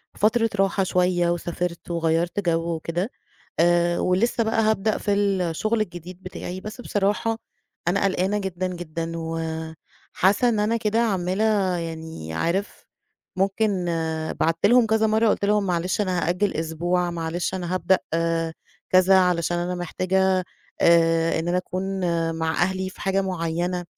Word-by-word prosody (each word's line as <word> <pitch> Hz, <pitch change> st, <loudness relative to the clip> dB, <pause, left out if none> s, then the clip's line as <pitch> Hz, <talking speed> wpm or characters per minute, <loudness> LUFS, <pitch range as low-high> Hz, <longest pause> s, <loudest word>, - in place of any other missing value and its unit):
فترة 225 Hz, +2 st, +2 dB
راحة 195 Hz, 0 st, +2 dB
شوية 180 Hz, -1 st, +2 dB
وسافَرت 175 Hz, 0 st, -3 dB
وغيَّرت 170 Hz, +2 st, 0 dB
جو 170 Hz, -2 st, 0 dB
وكده. 170 Hz, +5 st, -3 dB, 0.5 s
آآ، 175 Hz, 0 st, +3 dB
ولسه 215 Hz, +6 st, +1 dB
بقى 225 Hz, 0 st, +1 dB
هابدأ 215 Hz, -1 st, +1 dB
في 205 Hz, -, 0 dB
الشغل 200 Hz, +2 st, +1 dB
الجديد 180 Hz, -1 st, -7 dB
بتاعي، 185 Hz, 0 st, -6 dB
بس 215 Hz, +4 st, -7 dB
بصراحة، 210 Hz, +1 st, 0 dB, 0.5 s
أنا 195 Hz, +3 st, +2 dB
قلقانة 195 Hz, +1 st, +1 dB
جدًا 185 Hz, -2 st, -2 dB
جدًا 165 Hz, -2 st, -5 dB
و 165 Hz, 0 st, -3 dB, 0.7 s
حاسَّة 200 Hz, +6 st, +3 dB
إن 220 Hz, -3 st, 0 dB
أنا 220 Hz, +2 st, +1 dB
كده 220 Hz, 0 st, 0 dB
عمَّالة، 195 Hz, -2 st, +1 dB
يعني 160 Hz, -, -6 dB
عارِف، 170 Hz, -, -2 dB, 0.5 s
ممكن 195 Hz, 0 st, 0 dB, 0.5 s
بعَتّ 165 Hz, 0 st, +1 dB
لهُم 245 Hz, +2 st, +6 dB
كذا 220 Hz, 0 st, +2 dB
مرَّة 220 Hz, +1 st, +3 dB
قُلت 205 Hz, -, +1 dB
لهُم: 210 Hz, 0 st, +2 dB
"معلش 180 Hz, +2 st, 0 dB
أنا 185 Hz, -4 st, 0 dB
هأجِّل 190 Hz, +4 st, +1 dB
أسبوع، 175 Hz, +2 st, -1 dB
معلش 170 Hz, +2 st, -3 dB
أنا 180 Hz, -1 st, -3 dB
هابدأ 185 Hz, 0 st, +3 dB, 0.9 s
كذا 185 Hz, +1 st, +6 dB
علشان 175 Hz, -1 st, +1 dB
أنا 175 Hz, +1 st, -2 dB
محتاجة 185 Hz, +2 st, +1 dB, 0.4 s
آآ، 165 Hz, -1 st, +4 dB
إن 165 Hz, -, -3 dB
أنا 175 Hz, +1 st, +1 dB
أكون 185 Hz, +1 st, -3 dB, 0.5 s
مع 160 Hz, 0 st, -1 dB
أهلي 190 Hz, +1 st, -2 dB
في -, -, -13 dB
حاجة 195 Hz, 0 st, +1 dB
معيَّنة." 175 Hz, -1 st, -2 dB
185 Hz, 140 wpm, -24 LUFS, 170-200 Hz, 0.9 s, لهُم